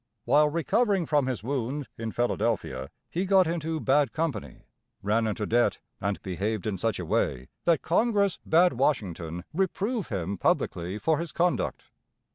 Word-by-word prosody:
While 150 +1 +5
recovering 190 +4 +1
from 145 -3 +2
his 125 -5 -3
wound, 135 +2 -2
in 115 -1 -4
Philadelphia, 70 - -1 0.2
he 185 +3 -2
got 190 -1 +5
into 160 -1 -2
bad 140 -2 +3
company, 150 - -3 0.4
ran 110 +3 +2
into 105 0 -2
debt, 120 +3 +2 0.2
and 100 +1 -1
behaved 100 +3 -2
in 100 -4 -2
such 110 -1 0
a 90 - -4
way 65 -4 0 0.2
that 170 -4 +3
Congress 200 0 +2
bade 175 +3 +5
Washington 90 - -1
reprove 195 +5 -1
him 95 -1 -3
publicly 90 +4 0
for 155 +6 +1
his 170 -1 -4
conduct. 175 +1 -1
135 Hz, 150 wpm, -27 LUFS, 100-170 Hz, 0.4 s, While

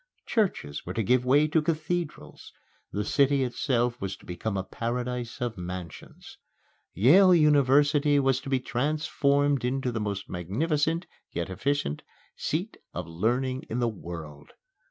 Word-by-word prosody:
Churches 190 - -1
were 90 - -6
to 115 - 0
give 125 +4 +3
way 145 +4 +4
to 155 +1 +2
cathedrals; 160 +1 -3 0.4
the 105 - -2
city 140 +2 +3
itself 125 -1 0
was 95 -1 -3
to - - -19
become 95 +4 -3
a 95 - -1
paradise 120 +3 -4
of 120 -5 -3
mansions. 90 -2 -8 0.6
Yale 180 - +6
University 145 -1 +4
was 135 -2 +2
to 135 - -7
be 135 -1 +2
transformed 140 +1 +1
into 130 0 -1
the 110 -2 -3
most 100 -2 -3
magnificent 150 - -1 0.2
yet 85 +2 -4
efficient 120 - -1 0.3
seat 180 +9 -3 0.2
of 90 - -3
learning 120 +10 -1
in 115 - -2
the 120 -1 +1
world. 85 -8 -8
125 Hz, 140 wpm, -27 LUFS, 100-145 Hz, 0.6 s, Yale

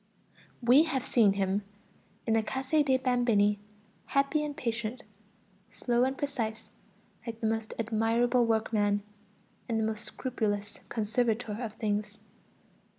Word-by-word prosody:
We 255 +7 +6
have 270 -6 -1
seen 215 -5 +4
him 195 0 0 0.6
in 225 - +1
the 225 - +4
Case 265 +4 -5
dei 290 -4 +4
Bambini 240 -5 +2 0.5
happy 275 +2 +2
and 295 -1 -4
patient, 235 +1 -3 0.7
slow 240 0 +1
and 265 0 -2
precise 230 -6 -3 0.6
like 225 -1 -5
the 225 - -3
most 225 0 -1
admirable 230 +2 +2
workman, 210 -2 +1 0.7
and 225 -1 +1
the - - +1
most 220 0 -3
scrupulous 215 -3 -3
conservator 225 0 0
of 225 -3 -4
things. 210 -1 -2
225 Hz, 125 wpm, -30 LUFS, 215-255 Hz, 0.7 s, We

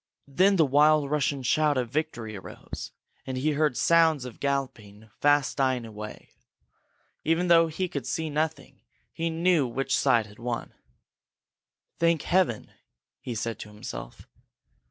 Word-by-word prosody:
Then 185 +8 +3
the 165 -4 +4
wild 145 +1 +4
Russian 145 -2 0
shout 150 +3 +2
of 120 -2 -2
victory 120 -8 -3
arose, 95 - -9 0.4
and 130 -1 -3
he 150 +4 +1
heard 150 -3 +1
sounds 160 -5 +3
of 125 - -9
galloping 110 -7 -4
fast 145 -1 +2
dying 130 -3 +1
away. 105 -1 -9 0.9
Even 165 +3 +1
though 165 -1 +6
he 180 +4 -2
could 180 - -5
see 160 -1 -2
nothing, 155 -1 -3 0.3
he 165 0 -2
knew 165 -3 +2
which 135 +3 -1
side 120 -5 +3
had 105 +1 -16
won. 120 0 -4 1.3
"Thank 165 -2 +2
Heaven!" 175 - +1 0.5
he 120 - -6
said 115 +1 -3
to 105 - -8
himself. 105 0 -9
140 Hz, 140 wpm, -27 LUFS, 120-160 Hz, 1.3 s, though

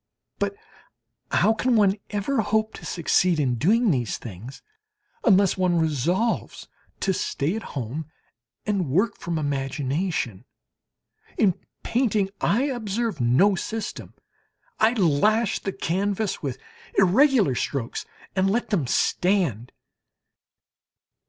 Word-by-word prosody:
But - - -1 0.7
how 220 - +3
can 250 +2 +1
one 200 -3 +4
ever 215 +5 0
hope 220 +1 0
to - - -9
succeed 175 0 +2
in 130 -4 +1
doing 220 - +3
these 125 -6 -1
things 115 +4 -10 0.6
unless 200 -4 +4
one 180 -2 +2
resolves 165 - 0 0.3
to 190 - +1
stay 165 0 -1
at 225 - -3 0.2
home 135 +5 -4 0.6
and 210 -2 0
to - - +1
work 195 - 0
from 170 -1 -3
imagination? 140 - -2 0.9
In 195 -4 +4 0.3
painting 215 -5 +1
I 235 +6 +2
observe 230 - -2
no 130 +13 +4
system; 220 +4 -5 0.6
I 225 +2 +4
lash 210 +3 +2
the 195 - -3
canvas 195 +3 -1
with 135 -4 -3 0.4
irregular 205 - +4
strokes 125 -1 -3 0.3
and 190 0 +2
let 230 +2 -1
them 165 - +1
stand. 165 - +1
190 Hz, 115 wpm, -24 LUFS, 145-220 Hz, 0.9 s, one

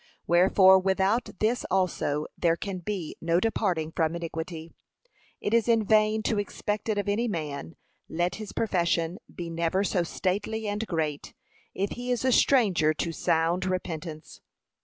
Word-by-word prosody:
Wherefore, 190 +2 +6
without 195 +5 +1
this 230 +3 +1
also 175 -5 0
there 165 -2 +2
can 190 +1 -5
be 180 -2 -4
no 165 +1 +2
departing 180 -7 0
from 160 0 +1
iniquity. 165 0 -6 0.7
It 205 - -2
is 230 -1 +3
in 230 -2 +3
vain 215 +1 +3
to 215 -1 0
expect 210 +1 -3
it 215 - +1
of 205 - -1
any 215 +4 +1
man, 155 -5 -4 0.3
let 175 +2 -1
his 215 -2 -7
profession 170 -4 0
be 170 -1 -6
never 170 +3 0
so 190 -2 +1
stately 205 +5 -2
and 205 +2 -2
great, 155 -4 -3 0.4
if 195 +1 -1
he 245 +1 -5
is 245 0 0
a 260 - +4
stranger 190 - +3
to 165 +2 -2
sound 165 +2 +1
repentance. 165 -4 -5
185 Hz, 155 wpm, -27 LUFS, 165-210 Hz, 0.7 s, Wherefore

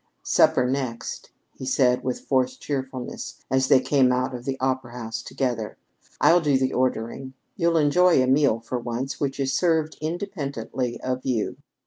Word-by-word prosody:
"Supper 125 - +4
next," 130 -3 -3 0.2
he - - -11
said 130 -1 +2
with 130 -1 -2
forced 130 -1 0
cheerfulness 130 -3 -5
as 130 0 +2
they 130 - +6
came 130 -1 +3
out 130 +1 0
of 120 -1 -7
the 135 -1 -2
opera 130 -2 -1
house 115 -2 -5
together. 120 -5 -3 0.4
"I'll 175 +1 +5
do 145 -4 +3
the 130 0 0
ordering. 130 +1 -2 0.2
You'll 170 -2 +2
enjoy 165 +2 +4
a 130 - +4
meal 130 -3 +3
for 125 +2 -3
once 120 +3 -4
which 140 -1 -2
is 135 -1 0
served 160 -3 +1
independently 140 - -3
of 130 0 -2
you." 120 -5 -1
130 Hz, 160 wpm, -24 LUFS, 125-140 Hz, 0.4 s, they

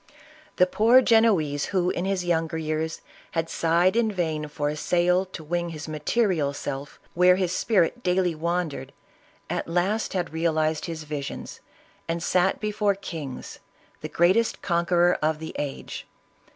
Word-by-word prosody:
The 180 - +5
poor 230 +7 +5
Genoese 195 -12 +3
who, 180 -2 0
in 175 - -2
his 190 -2 -1
younger 165 -2 0
years, 160 0 -3 0.3
had 165 -1 -1
sighed 170 +4 +2
in 230 -2 +2
vain 160 -5 -2
for 145 0 -3
a 150 - -3
sail 180 +4 +2
to 175 -3 -9
wing 175 +2 -2
his 160 -1 -7
material 155 -1 0
self 140 0 -6
where 180 +1 +5
his 185 -2 0
spirit 205 +3 +1
daily 180 -3 +1
wandered, 160 -4 -3 0.5
at - - -3
last 185 +6 0
had 175 -4 -2
realized 160 -1 0
his 165 -2 -5
visions, 145 -2 -6 0.5
and 165 0 -2
sat 185 +1 +2
before 210 -1 0
kings, 160 -9 -7 0.4
the - - -5
greatest 190 +7 +2
conqueror 175 0 +2
of 155 0 +1
the 160 +1 -8
age. 140 -2 -5
170 Hz, 150 wpm, -25 LUFS, 155-185 Hz, 0.5 s, The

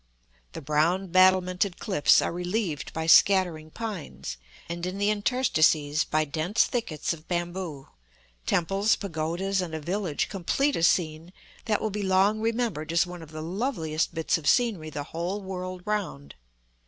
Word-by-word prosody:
The - - -7
brown 165 +6 +1
battlemented 185 +1 +3
cliffs 190 -8 +3
are - - -1
relieved 175 -5 -2
by 160 0 -3
scattering 170 -3 +4
pines, 160 - -6 0.3
and 170 0 -5
in 185 +2 -4
the 205 +1 +2
interstices 160 - +2
by 155 0 +1
dense 160 +8 +1
thickets 200 - -2
of 160 -1 -12
bamboo; 175 -5 -4 0.6
temples, 195 +5 +2
pagodas, 185 +2 -2
and 165 -3 -4
a - - -3
village 175 0 -2
complete 270 - 0
a - - -2
scene 165 -1 +1 0.3
that 215 -2 +1
will 215 - -2
be 210 +1 -3
long 195 +2 +3
remembered 225 -9 -1
as 170 +2 +3
one 180 -1 -9
of 160 - -11
the 155 0 -7
loveliest 170 - -2
bits 160 +1 +1
of 145 - +1
scenery 210 -11 +1
the 145 -2 -5
whole 175 +7 -4
world 185 -2 -6
round. 200 -9 -3
180 Hz, 155 wpm, -27 LUFS, 155-200 Hz, 0.6 s, scattering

